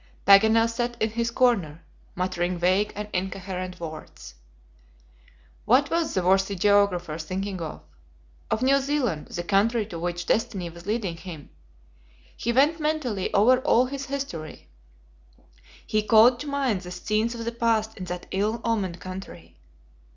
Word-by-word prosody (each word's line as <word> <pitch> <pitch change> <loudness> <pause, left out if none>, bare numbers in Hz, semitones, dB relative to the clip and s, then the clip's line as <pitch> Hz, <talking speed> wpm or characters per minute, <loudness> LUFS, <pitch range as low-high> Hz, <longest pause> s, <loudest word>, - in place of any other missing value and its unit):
Paganel 220 +3 +6
sat 240 +1 -3
in 220 - 0
his 235 +1 -1
corner, 210 - +1 0.3
muttering 180 -1 -1
vague 185 +4 +2
and 210 0 -5
incoherent 185 -1 -4
words. 155 - -9 1.3
What 270 +5 +3
was 335 -1 0
the 185 - +1
worthy 195 +2 +2
geographer 185 -4 +2
thinking 185 +3 -4
of? 160 -2 -6 0.7
Of 220 - 0
New 275 +1 +4
Zealand, 265 - -1
the 175 - -5
country 210 +4 +2
to 175 -5 -7
which 175 0 -3
destiny 205 -7 -1
was 170 +2 -13
leading 205 -6 -2
him. 165 -4 -10 0.8
He 235 - -2
went 290 +7 +3
mentally 300 -11 -1
over 235 +5 +5
all 255 -2 +3
his 275 +1 -6
history; 265 - -6 1.2
he 215 - +1
called 225 +3 +5
to 295 - -6
mind 270 -9 0
the 180 - -9
scenes 215 +6 -1
of 230 -1 -6
the 235 - -1
past 225 -2 0
in 185 - -7
that 180 0 -6
ill 210 +4 0
omened 195 -7 -1
country. 185 - -9
205 Hz, 145 wpm, -25 LUFS, 180-235 Hz, 1.3 s, Paganel